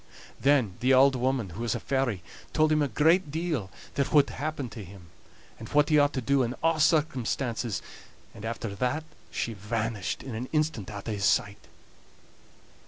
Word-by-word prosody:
Then 130 -10 +2
the 130 +2 +3
auld 135 +1 +6
woman, 130 -4 0
who 95 +7 -7
was 120 -2 0
a - - -2
fairy, 125 -9 -1 0.3
told 155 -1 +3
him 155 0 +3
a 145 - +2
great 160 - +3
deal 155 - -2 0.2
that 140 0 0
whould 145 -2 +5
happen 145 -2 -3
to 110 -1 -8
him, 90 -2 -13 0.5
and 110 - -8
what 150 +1 +3
he 150 -1 +5
ought 145 0 +3
to 130 - -1
do 140 +2 +2
in 125 0 -1
a' 165 -1 +3
circumstances; 130 - +1 0.5
and 105 - -11
after 115 -2 -4
that 125 +9 -1 0.3
she 115 - -3
vanished 105 -2 -3
in 130 - -6
an 120 +4 -4
instant 150 - 0
out 100 0 -7
o' - - -1
his 100 -2 -1
sight. 100 0 +1
130 Hz, 180 wpm, -28 LUFS, 110-145 Hz, 0.5 s, auld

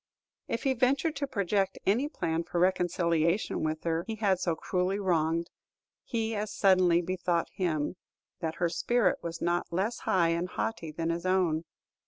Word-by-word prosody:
If 230 - -2
he 270 - +2
ventured 275 +5 +1
to 280 0 -1
project 200 -5 0
any 245 +9 +2
plan 165 - -1
for 175 - -5
reconciliation 175 0 +1
with 155 0 -2
her 165 0 0
he 225 - -3
had 200 -4 +1
so 170 -3 0
cruelly 185 +3 -1
wronged, 170 -3 0 0.5
he 225 -2 -2
as 210 0 -2
suddenly 185 -4 +4
bethought 180 -1 -1
him 170 -2 -1 0.4
that 160 -1 -3
her 175 - +1
spirit 235 +8 +1
was 165 0 -5
not 175 +1 0
less 195 +7 -1
high 170 -3 +2
and 170 +2 -1
haughty 170 -8 -3
than 165 +2 -2
his 170 +2 -3
own. 175 -4 +2
180 Hz, 165 wpm, -29 LUFS, 170-205 Hz, 0.5 s, suddenly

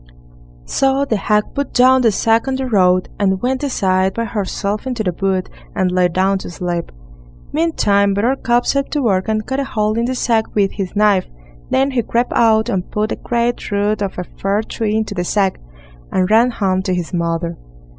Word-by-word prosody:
So 270 - +1
the 230 - 0
hag 210 +1 +2
put 280 -1 -3
down 260 +1 +5
the 230 -3 +4
sack 225 +4 +1
on 265 - 0
the 265 0 -2
road, 185 -6 +3
and 190 -2 +1
went 255 +3 -1
aside 190 -8 +1
by 230 - -1
herself 205 +1 -3
into 245 -4 -2
the 180 -3 -1
wood, 190 -1 0 0.3
and 185 -1 +1
lay 180 0 +3
down 190 +3 +1
to - - -8
sleep. 175 0 -4 0.6
Meantime 205 -11 +2
Buttercup 240 +2 +1
set 275 0 0
to 295 -2 0
work 190 -4 +1
and 215 -1 -1
cut 265 +1 -2
a - - 0
hole 215 -5 -1
in 235 - +1
the 255 +1 -2
sack 230 -3 0
with 200 -2 +2
his 195 -2 -5
knife; 205 -3 +3 0.4
then 270 +1 +2
he 255 -2 +1
crept 235 +2 -1
out 220 -1 +3
and 185 -1 -2
put 215 +1 -1
a - - 0
great 240 0 -2
root 205 +1 0
of 195 -2 -3
a 180 - -2
fir 195 +4 -2
tree 215 -1 -2
into 220 -2 -1
the 175 -3 -2
sack, 195 +1 0 0.5
and 185 +1 +1
ran 230 +3 +5
home 190 -5 0
to 185 -1 -1
his 175 0 -4
mother. 170 0 -1
210 Hz, 200 wpm, -18 LUFS, 190-240 Hz, 0.6 s, down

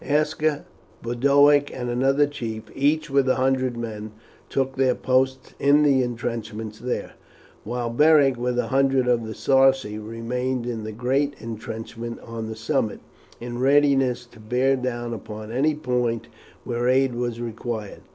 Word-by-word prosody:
Aska, 150 0 0 0.4
Boduoc, 140 +4 +4
and 125 -1 -5
another 135 +4 +3
chief, 115 -6 -5
each 150 +2 +1
with 135 -1 +3
a - - +4
hundred 130 -1 +1
men, 110 -2 -6 0.4
took 135 0 -1
their 130 -2 +2
posts 130 +1 0
in 145 +2 +5
the 140 -3 +4
intrenchments 115 -3 -4
there, 125 0 -3 0.5
while 120 +1 -3
Beric, 145 0 +5
with 125 0 -2
a 125 -2 0
hundred 135 -1 +2
of 120 -2 +1
the 110 - -6
Sarci, 135 -5 +3
remained 120 +3 -3
in 115 -3 -4
the 110 - -5
great 135 +6 0
intrenchment 115 +1 -6
on 115 -1 -6
the 110 - -5
summit, 115 0 -1 0.4
in 120 0 -6
readiness 135 -2 +3
to 120 -1 -18
bear 125 +5 +1
down 120 -2 -3
upon 110 0 -7
any 145 +5 +1
point 125 -5 -1 0.3
where 120 0 -1
aid 130 0 +3
was 120 -1 -3
required. 115 -2 -5
125 Hz, 150 wpm, -24 LUFS, 115-135 Hz, 0.5 s, in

